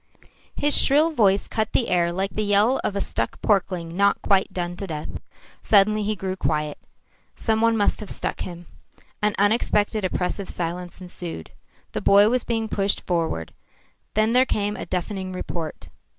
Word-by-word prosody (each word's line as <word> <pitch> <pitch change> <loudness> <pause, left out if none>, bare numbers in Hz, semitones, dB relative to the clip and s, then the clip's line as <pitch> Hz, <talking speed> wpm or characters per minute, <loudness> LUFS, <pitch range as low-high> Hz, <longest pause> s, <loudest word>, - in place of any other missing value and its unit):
His 290 0 +3
shrill 300 +4 +5
voice 200 -8 +2
cut 220 0 -2
the 240 - +2
air 170 -1 +2
like 190 +3 -2
the 215 - -1
yell 210 +5 +3
of 200 - -1
a 200 - 0
stuck - - -2
porkling 180 -5 0
not 200 +1 +3
quite 195 -1 +2
done 175 -1 -3
to 195 - -5
death. 155 -3 -5 0.5
Suddenly 215 +1 +4
he 210 +1 -1
grew 190 -1 -4
quiet. 150 -4 -1 0.6
Some 220 -1 0
one 230 0 +3
must 205 - +1
have 210 - -7
struck - - -4
him. 175 -1 -7 0.6
An 210 0 +1
unexpected, 210 0 +2
oppressive 185 +1 -2
silence 175 +2 -5
ensued. 175 - -6 0.4
The - - -3
boy 200 +2 +6
was 250 +1 +1
being 225 -2 -1
pushed 200 -2 -1
forward. 165 - -2 0.6
Then 215 +2 +2
there 250 +1 +6
came 205 0 -1
a - - -7
deafening 185 +1 -3
report. 170 -3 -5
200 Hz, 165 wpm, -23 LUFS, 180-215 Hz, 0.6 s, boy